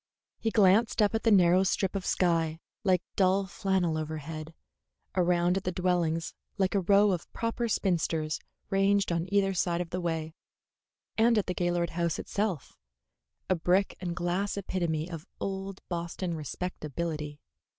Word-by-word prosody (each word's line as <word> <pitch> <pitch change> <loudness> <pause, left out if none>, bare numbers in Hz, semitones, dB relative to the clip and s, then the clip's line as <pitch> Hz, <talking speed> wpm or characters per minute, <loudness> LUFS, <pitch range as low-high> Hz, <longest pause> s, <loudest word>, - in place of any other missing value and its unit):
He 225 - 0
glanced 215 +1 +4
up 210 -1 +4
at 225 - 0
the 230 - +3
narrow 185 -3 +6
strip 190 0 0
of 190 -2 -3
sky 165 -3 +1 0.2
like 185 -3 +3
dull 195 0 +3
flannel 185 -3 0
overhead, 155 +1 -6 0.6
around 175 0 +3
at 195 - -3
the 185 - -1
dwellings 175 -3 0 0.2
like 190 -2 +1
a 200 - +3
row 200 +2 +4
of 175 -3 -3
proper 230 +1 -1
spinsters 165 -6 0 0.3
ranged 195 0 +3
on 170 +2 -1
either 195 -1 +3
side 175 -1 0
of 175 -2 -4
the 180 - -2
way, 160 -2 -2 0.9
and 230 0 +5
at 210 - +2
the 180 - -2
Gaylord 175 -1 0
house 170 -1 -1
itself, 200 -8 -3 0.7
a - - +3
brick 185 +3 +1
and 175 -2 -3
glass 180 +3 -1
epitome 170 -5 -1
of 165 -1 -8
old 195 0 -4
Boston 170 0 -3
respectability. 155 -1 -4
180 Hz, 150 wpm, -29 LUFS, 165-195 Hz, 0.9 s, narrow